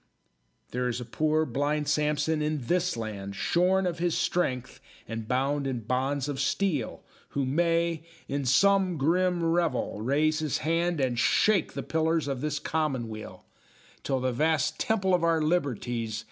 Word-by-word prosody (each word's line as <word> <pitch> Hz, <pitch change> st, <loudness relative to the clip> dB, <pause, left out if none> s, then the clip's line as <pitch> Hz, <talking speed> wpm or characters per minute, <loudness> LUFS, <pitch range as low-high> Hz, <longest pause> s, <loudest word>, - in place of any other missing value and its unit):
There 125 Hz, 0 st, -1 dB
is 120 Hz, 0 st, -2 dB
a 125 Hz, -, -6 dB
poor, 155 Hz, +6 st, +1 dB
blind 145 Hz, +3 st, -1 dB
Samson 150 Hz, +1 st, +1 dB
in 150 Hz, -4 st, -1 dB
this 180 Hz, -1 st, +1 dB
land, 100 Hz, -3 st, -5 dB
Shorn 185 Hz, -, +2 dB
of 175 Hz, -2 st, -2 dB
his 175 Hz, -1 st, +1 dB
strength 130 Hz, -8 st, -1 dB, 0.3 s
and 115 Hz, -1 st, -5 dB
bound 135 Hz, +3 st, 0 dB
in 125 Hz, -3 st, -2 dB
bonds 130 Hz, +4 st, -1 dB
of 145 Hz, -2 st, -3 dB
steel, 150 Hz, -, -1 dB, 0.3 s
Who 140 Hz, -, +1 dB
may, 165 Hz, +3 st, +1 dB, 0.3 s
in 140 Hz, 0 st, -2 dB
some 190 Hz, +6 st, +3 dB
grim 175 Hz, +4 st, +1 dB
revel, 165 Hz, -10 st, 0 dB
raise 150 Hz, +6 st, +2 dB
his 155 Hz, -3 st, -1 dB
hand, 165 Hz, +1 st, +1 dB
And 125 Hz, -3 st, 0 dB
shake 200 Hz, -, +3 dB
the -, -, -4 dB
pillars 160 Hz, -1 st, 0 dB
of 135 Hz, -3 st, -3 dB
this 150 Hz, -1 st, -1 dB
Commonweal, 130 Hz, -9 st, -3 dB, 0.6 s
Till 135 Hz, -2 st, -1 dB
the 130 Hz, 0 st, 0 dB
vast 150 Hz, +3 st, +1 dB
Temple 195 Hz, -4 st, +1 dB
of 175 Hz, -2 st, +2 dB
our 165 Hz, -1 st, +3 dB
liberties. 125 Hz, -8 st, -1 dB
150 Hz, 155 wpm, -28 LUFS, 130-165 Hz, 0.6 s, some